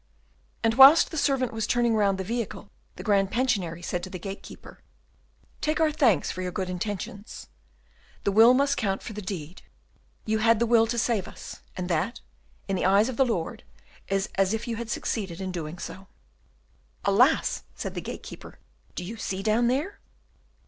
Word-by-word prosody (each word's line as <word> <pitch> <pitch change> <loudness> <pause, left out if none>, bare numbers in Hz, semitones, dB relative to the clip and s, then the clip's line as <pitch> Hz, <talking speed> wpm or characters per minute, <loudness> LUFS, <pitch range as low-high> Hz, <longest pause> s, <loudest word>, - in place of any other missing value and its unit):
And 225 0 +3
whilst 270 +6 +8
the - - -6
servant 270 -4 +1
was 220 -1 -2
turning 240 -1 +2
round 200 -3 +2
the 190 - -3
vehicle 230 +3 -4 0.2
the - - -8
Grand 200 -3 +2
Pensionary 200 -9 -1
said 175 0 -2
to 185 - -7
the 185 - -6
gatekeeper, 195 +3 -9 0.8
"Take 305 +1 0
our 315 -1 +3
thanks 245 - +2
for 185 - -6
your 180 0 -3
good 185 -1 -3
intentions; 200 +2 -5 0.8
the 200 - +1
will 225 +5 +7
must 280 +1 +2
count 195 -4 -1
for 225 - -7
the 210 - -6
deed; 180 -3 -6 0.6
you 220 0 0
had 230 +1 +4
the 235 - +1
will 225 -1 +4
to 235 +1 -2
save 225 -4 0
us, - - -10 0.2
and 180 -1 -3
that, 175 +7 -1 0.5
in 195 - -1
the 180 - -1
eyes 200 +5 +4
of 250 - -5
the 270 - +5
Lord, 180 -9 -3 0.4
is 195 +1 0
as 195 +2 +3
if 225 +2 -6
you 230 -2 -3
had 235 -1 -5
succeeded 195 -7 -3
in 190 -1 -4
doing 165 -1 -5
so." 190 +2 -8 1.0
"Alas!" 240 +10 +3
said - - -5
the - - -4
gatekeeper, - - -9 0.4
"do 180 - -4
you 220 +6 -7
see 195 -3 -4
down 220 +3 +2
there?" 290 +11 -1
215 Hz, 185 wpm, -26 LUFS, 190-235 Hz, 1.0 s, whilst